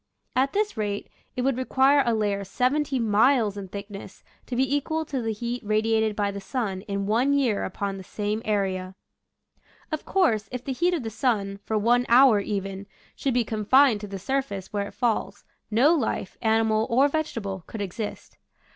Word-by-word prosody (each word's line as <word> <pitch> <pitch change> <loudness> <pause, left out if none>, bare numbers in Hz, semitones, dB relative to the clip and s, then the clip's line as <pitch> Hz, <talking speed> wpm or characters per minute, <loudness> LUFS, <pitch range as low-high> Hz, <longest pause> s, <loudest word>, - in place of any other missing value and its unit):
At 265 +2 +2
this 420 +1 0
rate 205 -2 -3 0.3
it 250 - -1
would 265 -1 +1
re - - 0
quire 270 +2 +4
a 235 -1 +1
layer 205 -2 0
seventeen 255 +4 0
miles 220 0 +3
in 200 -1 -6
thickness 200 +1 -9 0.2
to 250 - -4
be 265 +3 +1
equal 315 +3 -1
to 275 -4 -3
the 225 -1 -1
heat 235 +3 -4
radiated 220 0 +1
by 205 -1 0
the 200 0 -6
sun 195 -3 -3
in 200 -1 -2
one 240 +7 +2
year 255 -8 +1
upon 195 +1 -3
the 190 - -8
same 210 +3 -3
area. 190 -3 -1 1.0
Of 310 - -3
course, 225 - +1
if 250 -1 -6
the 270 - -2
heat 350 +6 +1
of 305 - -3
the 225 - -4
sun, 210 -4 -1
for 220 - 0
one 240 +3 +2
hour 240 -2 +7
even, 195 -1 -4 0.3
should 270 -3 -1
be 245 - +3
confined 220 +2 +3
to 210 - -6
the 195 0 -6
surface 200 -2 -3
where 200 -1 -1
it - - -13
falls, 240 -3 -1 0.3
no 250 +9 +4
life, 275 - -2
animal 220 0 +2
or 260 +5 +4
vegetable, 230 - -3
could 220 - -7
exist. 205 +3 -6
225 Hz, 185 wpm, -25 LUFS, 200-260 Hz, 1.0 s, hour